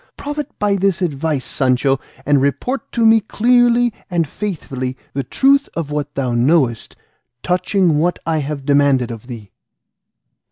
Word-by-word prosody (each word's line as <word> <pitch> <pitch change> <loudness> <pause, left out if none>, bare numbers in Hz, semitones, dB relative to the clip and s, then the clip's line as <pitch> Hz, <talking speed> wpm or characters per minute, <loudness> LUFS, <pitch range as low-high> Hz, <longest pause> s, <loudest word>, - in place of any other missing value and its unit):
Profit 295 0 -4
by 205 -1 +1
this 195 -1 +1
advice, 150 -3 -1
Sancho, 135 0 +1 0.3
and 145 -2 +3
report 140 - -2
to 230 -2 +2
me 225 0 +6
clearly 240 +2 +3 0.2
and 170 -4 0
faithfully 135 -9 -5 0.2
the 140 - -1
truth 275 - +2
of 160 -3 -4
what 145 -1 -3
thou 130 -3 -1
knowest 120 -1 +1 0.5
touching 180 -3 +1
what 175 +3 +1
I 160 -1 0
have 140 -1 -5
demanded 140 -4 +2
of 115 +1 -9
thee." 110 -6 -9
150 Hz, 145 wpm, -18 LUFS, 135-205 Hz, 0.5 s, me